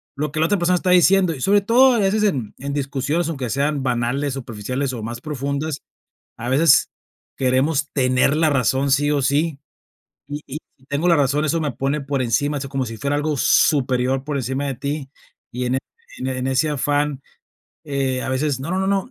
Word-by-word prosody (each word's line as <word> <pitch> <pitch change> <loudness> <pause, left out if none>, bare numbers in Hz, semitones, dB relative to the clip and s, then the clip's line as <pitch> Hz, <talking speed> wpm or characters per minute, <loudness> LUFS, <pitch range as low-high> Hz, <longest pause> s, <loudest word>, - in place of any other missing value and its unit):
lo 150 +2 -2
que 155 - -3
la 160 - +3
otra 205 +3 +2
persona 180 +1 +2
está 180 +1 -1
diciendo, 180 -1 +5
y 130 - -9
sobre 200 +1 +4
todo 250 +5 +5
a - - +1
veces 205 +2 +1
en 130 - 0
en 140 +1 -4
discusiones, 145 +4 -1
aunque 135 -7 -3
sean 140 +1 0
banales, 125 +3 -1
superficiales 130 +2 -4
o 115 -3 -6
más 120 +1 -5
profundas, 140 +1 -3 0.6
a 120 +2 -6
veces 145 +3 +4 0.5
queremos 135 +3 +1
tener 130 +1 +2
la 160 -1 +3
razón 135 +1 +1
sí 145 +2 +2
o 140 -2 +1
sí, 145 +2 0 0.7
y 145 +1 -5
y 145 +3 -6 0.2
si 130 - -26
tengo 145 +5 -1
la 170 - +5
razón 145 +2 +2
eso 165 +2 0
me 145 -3 -1
pone 135 +4 -1
por 140 -1 -2
encima, 145 +5 0
eso 135 0 -6
como 135 -2 -2
si 115 -1 -6
fuera 140 +3 -1
algo 150 0 -1
superior 130 -1 +2
por 145 -1 -3
encima 135 +2 -2
de 135 - -3
ti, 140 +1 -4 0.4
y 125 +1 -3
en 130 +2 0 0.4
en 130 - -3
en 130 0 -2
ese 135 +4 +1
afán, 145 -1 0 0.6
eh, 135 -3 -1
a - - -4
veces, 130 0 -1
no, 145 - -5
no, 185 - 0
no, 190 - 0
no, 200 +5 0
140 Hz, 205 wpm, -21 LUFS, 130-155 Hz, 0.7 s, diciendo